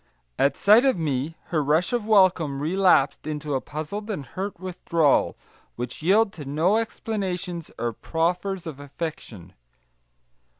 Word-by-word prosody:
At 140 Hz, 0 st, +2 dB
sight 215 Hz, +5 st, +6 dB
of 265 Hz, -7 st, +3 dB
me, 150 Hz, -1 st, -2 dB
her 155 Hz, -3 st, +1 dB
rush 155 Hz, -, +1 dB
of 235 Hz, -3 st, -1 dB
welcome 185 Hz, -9 st, +3 dB
relapsed 165 Hz, -3 st, +2 dB
into 150 Hz, -1 st, -3 dB
a 135 Hz, -, 0 dB
puzzled 170 Hz, +9 st, -6 dB
and 185 Hz, -10 st, -4 dB
hurt 190 Hz, +7 st, -5 dB
withdrawal, 170 Hz, -5 st, +1 dB, 0.4 s
which 120 Hz, +3 st, -6 dB
yielded 200 Hz, +5 st, +3 dB
to 150 Hz, -, -8 dB
no 160 Hz, +9 st, +2 dB
explanations 190 Hz, -6 st, -3 dB
or 120 Hz, -1 st, -2 dB
proffers 175 Hz, -, -2 dB
of 155 Hz, -4 st, -7 dB
affection. 140 Hz, -, -7 dB
165 Hz, 135 wpm, -25 LUFS, 145-195 Hz, 0.4 s, sight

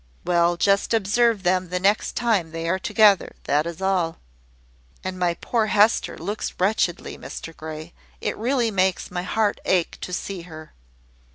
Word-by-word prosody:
"Well, 175 Hz, -1 st, +2 dB
just 200 Hz, +4 st, +2 dB
observe 225 Hz, 0 st, +2 dB
them 185 Hz, 0 st, +1 dB
the 180 Hz, +1 st, -1 dB
next 200 Hz, +3 st, +1 dB
time 215 Hz, -9 st, +1 dB
they 165 Hz, +1 st, -5 dB
are 185 Hz, +3 st, +1 dB
together; 210 Hz, 0 st, +3 dB
that 150 Hz, +3 st, +1 dB
is 170 Hz, +2 st, -6 dB
all." 180 Hz, -4 st, +1 dB, 0.9 s
"And 185 Hz, 0 st, -4 dB
my 175 Hz, -1 st, +1 dB
poor 225 Hz, +4 st, 0 dB
Hester 210 Hz, +2 st, +3 dB
looks 205 Hz, +6 st, -4 dB
wretchedly, 185 Hz, -2 st, 0 dB
Mr 165 Hz, -, -8 dB
Grey. 155 Hz, +1 st, -8 dB, 0.3 s
It -, -, -2 dB
really 240 Hz, 0 st, 0 dB
makes 190 Hz, -2 st, 0 dB
my 180 Hz, 0 st, -2 dB
heart 205 Hz, +3 st, 0 dB
ache 180 Hz, -3 st, 0 dB
to -, -, -5 dB
see 185 Hz, 0 st, -4 dB
her." 155 Hz, -1 st, -11 dB
185 Hz, 160 wpm, -23 LUFS, 170-210 Hz, 0.9 s, together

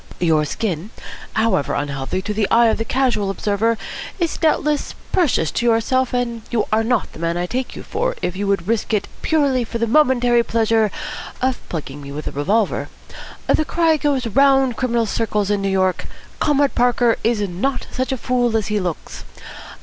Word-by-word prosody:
Your 160 Hz, -3 st, +2 dB
skin, 185 Hz, +2 st, -3 dB, 0.4 s
however 220 Hz, -10 st, +1 dB
unhealthy 140 Hz, +5 st, -3 dB
to 210 Hz, -, -2 dB
the 210 Hz, -1 st, 0 dB
eye 235 Hz, 0 st, +5 dB
of 220 Hz, -, 0 dB
the -, -, 0 dB
casual 250 Hz, -7 st, +1 dB
observer, 210 Hz, +3 st, 0 dB, 0.4 s
is 340 Hz, -4 st, -1 dB
doubtless 300 Hz, -2 st, 0 dB, 0.2 s
precious 290 Hz, -, +2 dB
to 240 Hz, -, -1 dB
yourself, 240 Hz, +3 st, +2 dB
and 240 Hz, -2 st, -2 dB
you 235 Hz, -3 st, 0 dB
are 220 Hz, +1 st, +3 dB
not 235 Hz, -2 st, 0 dB
the -, -, -11 dB
man 170 Hz, +1 st, -1 dB
I 175 Hz, -, -1 dB
take 250 Hz, +7 st, -3 dB
you -, -, -8 dB
for -, -, -2 dB
if 180 Hz, -, -3 dB
you 200 Hz, +1 st, -2 dB
would 195 Hz, -3 st, 0 dB
risk 225 Hz, 0 st, 0 dB
it 200 Hz, -, -1 dB
purely 280 Hz, -5 st, +2 dB
for 230 Hz, 0 st, -4 dB
the 230 Hz, -, +1 dB
momentary 245 Hz, -2 st, +4 dB
pleasure 225 Hz, -1 st, +2 dB, 0.5 s
of 260 Hz, 0 st, 0 dB
plugging 145 Hz, -3 st, -5 dB
me 140 Hz, 0 st, -8 dB
with 150 Hz, +1 st, -6 dB
a -, -, -3 dB
revolver. 200 Hz, +9 st, 0 dB, 0.6 s
The 310 Hz, -, +3 dB
cry 330 Hz, 0 st, +2 dB
goes 280 Hz, -4 st, 0 dB
round 270 Hz, +1 st, +3 dB
criminal 235 Hz, -2 st, 0 dB
circles 210 Hz, -2 st, -1 dB
in 205 Hz, -1 st, +1 dB
New 195 Hz, -, 0 dB
York, 185 Hz, -1 st, 0 dB, 0.3 s
'Comrade 285 Hz, -2 st, +2 dB
Parker 245 Hz, -1 st, +3 dB
is 230 Hz, -1 st, +2 dB
not 200 Hz, +10 st, -2 dB
such 260 Hz, +1 st, -2 dB
a 265 Hz, -, -1 dB
fool 245 Hz, -2 st, +1 dB
as 220 Hz, -1 st, -2 dB
he 210 Hz, 0 st, +1 dB
looks.' 175 Hz, -4 st, -5 dB
230 Hz, 185 wpm, -20 LUFS, 195-255 Hz, 0.6 s, eye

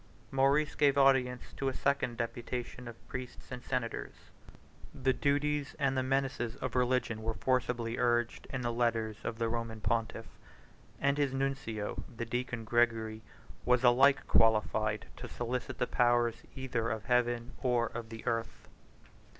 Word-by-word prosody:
Maurice 140 Hz, +3 st, +3 dB
gave 145 Hz, -2 st, +3 dB
audience 130 Hz, -2 st, +4 dB
to 135 Hz, -, 0 dB
a 130 Hz, -, -5 dB
second 125 Hz, -4 st, 0 dB
deputation 120 Hz, +1 st, -4 dB
of 115 Hz, -1 st, -11 dB
priests 130 Hz, -2 st, -7 dB
and 125 Hz, -1 st, -6 dB
senators: 125 Hz, -3 st, -3 dB, 0.8 s
the 130 Hz, 0 st, +2 dB
duties 145 Hz, +1 st, 0 dB
and 135 Hz, -1 st, +1 dB
the 130 Hz, -, +2 dB
menaces 130 Hz, -3 st, -1 dB
of 130 Hz, -, -4 dB
religion 125 Hz, -3 st, +1 dB
were 110 Hz, 0 st, -2 dB
forcibly 125 Hz, +1 st, 0 dB
urged 120 Hz, -1 st, +1 dB
in 135 Hz, -, -3 dB
the 120 Hz, -1 st, -1 dB
letters 115 Hz, -2 st, 0 dB
of 115 Hz, -, -3 dB
the 115 Hz, 0 st, 0 dB
Roman 115 Hz, -1 st, -3 dB
pontiff; 115 Hz, 0 st, -1 dB, 0.7 s
and 140 Hz, +1 st, +2 dB
his 140 Hz, -2 st, +1 dB
nuncio, 135 Hz, -6 st, -2 dB
the 115 Hz, -, -2 dB
deacon 120 Hz, 0 st, -3 dB
Gregory, 110 Hz, -1 st, +1 dB, 0.4 s
was 125 Hz, +2 st, +3 dB
alike 135 Hz, +3 st, +5 dB
qualified 110 Hz, -1 st, +3 dB
to -, -, -7 dB
solicit 125 Hz, +2 st, -3 dB
the -, -, +1 dB
powers 120 Hz, -1 st, +2 dB, 0.2 s
either 125 Hz, -4 st, -2 dB
of 110 Hz, -1 st, -3 dB
heaven 120 Hz, 0 st, +1 dB
or 125 Hz, -3 st, +2 dB
of 115 Hz, -1 st, -6 dB
the 115 Hz, 0 st, -9 dB
earth. 115 Hz, -1 st, -3 dB
120 Hz, 150 wpm, -32 LUFS, 115-130 Hz, 0.8 s, alike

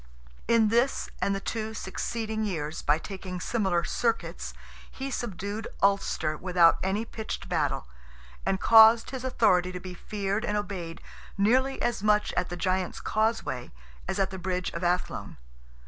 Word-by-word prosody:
In 230 Hz, -2 st, +4 dB
this 240 Hz, +5 st, +1 dB
and 200 Hz, -, +1 dB
the -, -, -2 dB
two 220 Hz, +2 st, -4 dB
succeeding 220 Hz, +2 st, -3 dB
years, 160 Hz, -6 st, -3 dB
by 150 Hz, +1 st, +3 dB
taking 185 Hz, 0 st, -6 dB
similar 190 Hz, -4 st, 0 dB
"circuits," 230 Hz, +5 st, -1 dB, 0.4 s
he 270 Hz, +1 st, -5 dB
subdued 210 Hz, -2 st, -4 dB
Ulster, 195 Hz, -6 st, +1 dB
without 175 Hz, 0 st, +4 dB
any 200 Hz, +4 st, 0 dB
pitched 215 Hz, -3 st, -6 dB
battle, 150 Hz, -, 0 dB, 0.6 s
and 190 Hz, -, 0 dB
caused 225 Hz, +2 st, +7 dB
his 260 Hz, -2 st, -5 dB
authority 185 Hz, -8 st, +3 dB
to 180 Hz, -, -5 dB
be 180 Hz, 0 st, -8 dB
feared 200 Hz, +3 st, -3 dB
and 210 Hz, -3 st, 0 dB
obeyed 185 Hz, -5 st, -5 dB, 0.4 s
nearly 260 Hz, +7 st, +3 dB
as 240 Hz, -4 st, 0 dB
much 210 Hz, 0 st, +2 dB
at 180 Hz, -, 0 dB
the 175 Hz, -, -5 dB
Giant's 185 Hz, 0 st, -1 dB
Causeway 215 Hz, -, -1 dB, 0.4 s
as -, -, -2 dB
at 195 Hz, -1 st, +1 dB
the 190 Hz, -, -6 dB
bridge 180 Hz, 0 st, -2 dB
of 170 Hz, -, -5 dB
Athlone. 180 Hz, +1 st, -1 dB
195 Hz, 150 wpm, -28 LUFS, 180-220 Hz, 0.6 s, caused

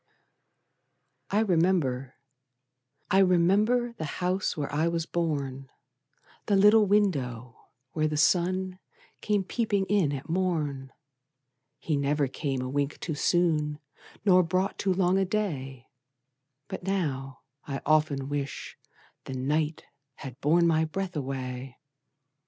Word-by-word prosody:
I 205 Hz, +2 st, +2 dB
remember, 165 Hz, -, +1 dB, 1.0 s
I 190 Hz, -, +5 dB
remember, 200 Hz, +7 st, +3 dB
The -, -, -2 dB
house 185 Hz, 0 st, -1 dB
where 145 Hz, -1 st, -3 dB
I 155 Hz, +3 st, +2 dB
was 170 Hz, -1 st, -1 dB
born, 140 Hz, -6 st, -3 dB, 0.8 s
The 205 Hz, -, +3 dB
little 210 Hz, +2 st, +6 dB
window 130 Hz, -, 0 dB, 0.2 s
where 155 Hz, -1 st, 0 dB
the 150 Hz, 0 st, -2 dB
sun 185 Hz, +3 st, +1 dB, 0.4 s
Came 205 Hz, -2 st, +1 dB
peeping 205 Hz, -1 st, 0 dB
in 190 Hz, -7 st, +2 dB
at 140 Hz, -1 st, -5 dB
morn; 155 Hz, -7 st, -1 dB, 0.9 s
He 155 Hz, -3 st, -1 dB
never 140 Hz, 0 st, +1 dB
came 135 Hz, -1 st, -3 dB
a -, -, -3 dB
wink 140 Hz, +2 st, -2 dB
too 160 Hz, -, -3 dB
soon, 150 Hz, -2 st, +1 dB, 0.5 s
Nor 185 Hz, -2 st, +6 dB
brought 185 Hz, +3 st, -1 dB
too 195 Hz, -, +1 dB
long 185 Hz, 0 st, +2 dB
a -, -, +3 dB
day, 140 Hz, -, -3 dB, 0.8 s
But -, -, -6 dB
now, 145 Hz, -9 st, -2 dB, 0.3 s
I 135 Hz, -1 st, -3 dB
often 150 Hz, -3 st, +2 dB
wish 140 Hz, -1 st, -5 dB, 0.5 s
the 130 Hz, -, -5 dB
night 150 Hz, +4 st, -1 dB, 0.3 s
Had 130 Hz, -2 st, -10 dB
borne 170 Hz, +4 st, +4 dB
my 160 Hz, -1 st, +3 dB
breath 180 Hz, +3 st, -4 dB
away! 130 Hz, -2 st, -5 dB
160 Hz, 125 wpm, -28 LUFS, 140-185 Hz, 1.0 s, little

